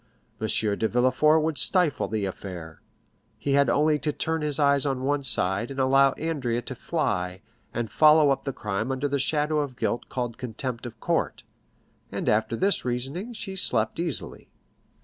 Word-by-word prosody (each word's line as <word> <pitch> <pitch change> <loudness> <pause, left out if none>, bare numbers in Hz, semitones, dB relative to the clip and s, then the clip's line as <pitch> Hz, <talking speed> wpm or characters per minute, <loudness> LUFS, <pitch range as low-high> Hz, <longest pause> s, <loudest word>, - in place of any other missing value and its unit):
M. 110 - 0
de 105 0 +1
Villefort 130 +7 +3
would 160 -2 -1
stifle 180 -6 +2
the 110 -2 -2
affair; 90 -4 -7 0.6
he 140 - -3
had 140 -2 +4
only 150 +4 +2
to 150 - -1
turn 160 +1 -2
his 150 -1 -1
eyes 140 -2 +3
on 135 -2 -1
one 145 +1 0
side, 100 -4 +2
and 135 0 -6
allow 135 +1 +4
Andrea 130 -7 -2
to 130 - -5
fly, 95 - -2 0.3
and 115 -3 -4
follow 150 0 +6
up 135 0 -1
the 135 - -2
crime 110 +1 -3
under 135 +2 -1
that 140 0 -1
shadow 150 +2 +1
of 140 -4 -3
guilt 120 - -2
called 120 -3 -4
contempt 125 0 -5
of 120 -1 -12
court. - - -1 0.7
And - - -4
after 110 +2 +1
this 195 - +1
reasoning 135 - -3
she 215 -4 -6
slept 115 - +1
easily. 170 -7 -2
135 Hz, 170 wpm, -26 LUFS, 115-150 Hz, 0.7 s, follow